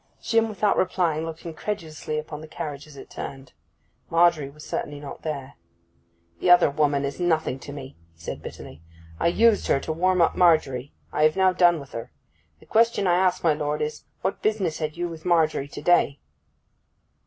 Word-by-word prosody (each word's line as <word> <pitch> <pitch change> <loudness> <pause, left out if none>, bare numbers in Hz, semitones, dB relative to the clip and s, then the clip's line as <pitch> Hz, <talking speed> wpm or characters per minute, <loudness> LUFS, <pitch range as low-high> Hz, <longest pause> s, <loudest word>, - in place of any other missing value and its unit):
Jim, 225 -1 +1
without 210 -1 +1
replying, 170 -4 0
looked 165 +1 -8
incredulously 160 -3 -4
into 155 0 -5
the 155 +1 -10
carriage 150 -2 -6
as 145 -2 -14
it - - -10
turned. 135 -1 -8 0.6
Margery 165 -4 +3
was 150 +2 -13
certainly 145 0 -4
not 145 -1 -9
there. 140 -3 -5 0.9
'The - - +1
other 175 -4 +7
woman 145 -1 +1
is 140 +4 -5
nothing 160 -6 0
to 145 - -9
me,' 140 -2 -9 0.2
he - - -31
said 85 - -6
bitterly. 80 - -10 0.4
'I - - +2
used 220 +5 +3
her 135 - +3
to 160 - -3
warm 185 +3 +2
up 165 - +3
Margery: 145 -7 +3 0.2
I - - 0
have 155 0 +4
now 190 -1 +4
done 175 -2 +4
with 140 -2 -11
her. 115 - -7 0.5
The - - -19
question 230 -2 +2
I 175 - +4
ask, 180 0 +2
my 165 -2 +4
lord, 150 0 -2
is, 150 0 -3 0.2
what 190 - -2
business 195 -7 0
had 155 0 -3
you 175 0 -1
with 165 -2 -9
Margery 160 -5 +2
to - - -9
day? 175 -5 +3
160 Hz, 190 wpm, -25 LUFS, 145-175 Hz, 0.9 s, other